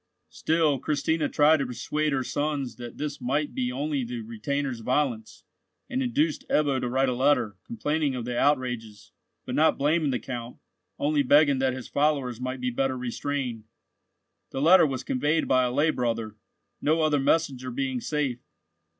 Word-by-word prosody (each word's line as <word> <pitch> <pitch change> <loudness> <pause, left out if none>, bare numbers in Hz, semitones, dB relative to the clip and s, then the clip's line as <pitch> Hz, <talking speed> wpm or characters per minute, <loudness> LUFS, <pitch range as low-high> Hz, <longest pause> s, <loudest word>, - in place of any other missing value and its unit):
Still 155 -4 +1
Christina 155 +2 0
tried 150 +2 +5
to 140 - -1
persuade 150 +5 -2
her 135 -2 0
sons 140 -5 -2
that 120 -1 -8
this 145 -1 -4
might 145 +4 -1
be 125 -1 -1
only 140 +1 -2
the 120 0 -5
retainers' 120 +4 -3
violence, 125 -2 -1 0.5
and 260 0 0
induced 270 +5 0
Ebbo 140 -3 +2
to 125 - -2
write 135 +2 +2
a 125 - +1
letter, 125 -5 +2
complaining 155 - -1
of 120 -2 -4
the 125 0 -3
outrages, 125 -6 -1 0.3
but - - -5
not 160 +1 +3
blaming 150 +2 +2
the 130 - 0
Count, 120 -1 -7 0.4
only 145 0 +1
begging 145 0 +4
that 130 -1 +1
his 130 - -7
followers 140 -5 0
might 130 +1 -3
be 125 0 -1
better 130 +1 -1
restrained. 125 -2 -3 0.8
The 135 - -4
letter 165 +3 +6
was 130 -2 -4
conveyed 145 +5 0
by 130 -1 +3
a 125 - -1
lay 150 +5 +2
brother—no 115 +6 -3
other 150 -2 +2
messenger 135 -3 +1
being 130 0 -2
safe. 140 -5 -1
135 Hz, 165 wpm, -26 LUFS, 125-150 Hz, 0.8 s, letter